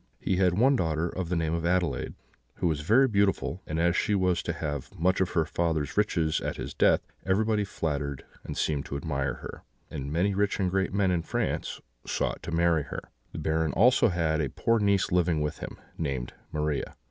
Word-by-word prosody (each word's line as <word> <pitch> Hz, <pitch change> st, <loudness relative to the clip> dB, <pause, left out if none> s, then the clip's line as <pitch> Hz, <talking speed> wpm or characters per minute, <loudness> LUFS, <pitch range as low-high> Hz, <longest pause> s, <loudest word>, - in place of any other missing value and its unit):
He 95 Hz, -, 0 dB
had 90 Hz, -1 st, +3 dB
one 135 Hz, +5 st, +5 dB
daughter, 80 Hz, -6 st, 0 dB
of 90 Hz, 0 st, -4 dB
the 90 Hz, -, 0 dB
name 80 Hz, -1 st, 0 dB
of 85 Hz, 0 st, -1 dB
Adelaide, 90 Hz, 0 st, 0 dB, 0.4 s
who -, -, -3 dB
was 75 Hz, -3 st, 0 dB
very 115 Hz, -, +5 dB
beautiful; 100 Hz, -4 st, +1 dB
and 80 Hz, +1 st, -2 dB
as 85 Hz, +1 st, +3 dB
she 105 Hz, -, +2 dB
was 90 Hz, -2 st, +2 dB
to -, -, -2 dB
have 75 Hz, -5 st, -5 dB
much 95 Hz, +3 st, +2 dB
of 90 Hz, -, 0 dB
her 80 Hz, -, +4 dB
father's 80 Hz, -4 st, -1 dB
riches 85 Hz, -7 st, +1 dB
at -, -, -3 dB
his -, -, -5 dB
death, -, -, +4 dB, 0.2 s
everybody 105 Hz, +2 st, +2 dB
flattered 75 Hz, -7 st, -3 dB, 0.2 s
and -, -, -6 dB
seemed 75 Hz, -3 st, 0 dB
to 70 Hz, -, -3 dB
admire 70 Hz, -3 st, -2 dB
her, -, -, -9 dB, 0.3 s
and 70 Hz, 0 st, -5 dB
many 90 Hz, +6 st, +1 dB
rich 100 Hz, +1 st, 0 dB
and 95 Hz, -2 st, +1 dB
great 95 Hz, 0 st, +1 dB
men 100 Hz, -1 st, +2 dB
in 85 Hz, -2 st, +1 dB
France 80 Hz, -, -2 dB, 0.3 s
sought -, -, -1 dB
to -, -, -6 dB
marry 85 Hz, -1 st, +3 dB
her. -, -, -6 dB, 0.3 s
The -, -, -8 dB
Baron 80 Hz, -2 st, 0 dB
had -, -, -5 dB
also 120 Hz, +2 st, +5 dB
a 80 Hz, -4 st, 0 dB
poor 115 Hz, 0 st, +2 dB
niece 100 Hz, -2 st, +2 dB
living 90 Hz, -3 st, +2 dB
with 75 Hz, 0 st, -2 dB
him, -, -, -7 dB, 0.2 s
named 70 Hz, -6 st, -2 dB, 0.2 s
Maria. 75 Hz, -1 st, -2 dB
85 Hz, 205 wpm, -28 LUFS, 80-95 Hz, 0.4 s, one